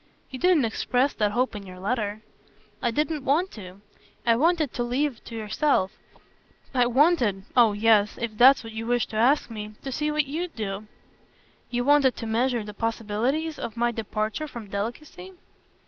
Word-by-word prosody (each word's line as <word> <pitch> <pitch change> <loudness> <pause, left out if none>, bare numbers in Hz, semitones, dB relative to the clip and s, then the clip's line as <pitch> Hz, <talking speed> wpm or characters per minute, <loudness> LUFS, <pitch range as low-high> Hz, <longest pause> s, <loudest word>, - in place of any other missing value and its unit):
"You 260 - -6
didn't 355 -7 +4
express 250 +4 0
that 210 -2 0
hope 250 0 0
in 205 - -6
your 185 -1 -11
letter." 210 +1 -2 0.6
"I 240 - +1
didn't 300 +4 -1
want 320 +8 +1
to. 190 -2 -11 0.4
I 230 -1 +4
wanted 315 +1 +2
to - - -3
leave 255 +2 -1
it - - -25
to 230 - -8
yourself. 215 -2 +1 0.8
I 250 -2 +3
wanted 245 - +3
oh 235 -4 +6
yes, 210 0 +3
if 235 -2 -3
that's 260 +4 +6
what 225 -1 -9
you 225 +1 -5
wish 245 -1 +1
to - - -8
ask 250 +4 +3
me 215 -1 -7
to 270 - -4
see 300 +4 -1
what 300 -1 +1
you'd 325 +5 -4
do." 210 -1 -4 0.8
"You 245 0 -1
wanted 280 -2 +4
to - - -6
measure 235 +1 0
the 210 0 -8
possibilities 230 +8 -2
of 230 - -6
my 240 0 +2
departure 220 +5 -3
from 230 -7 -9
delicacy?" 240 - -5
240 Hz, 180 wpm, -25 LUFS, 215-280 Hz, 0.8 s, oh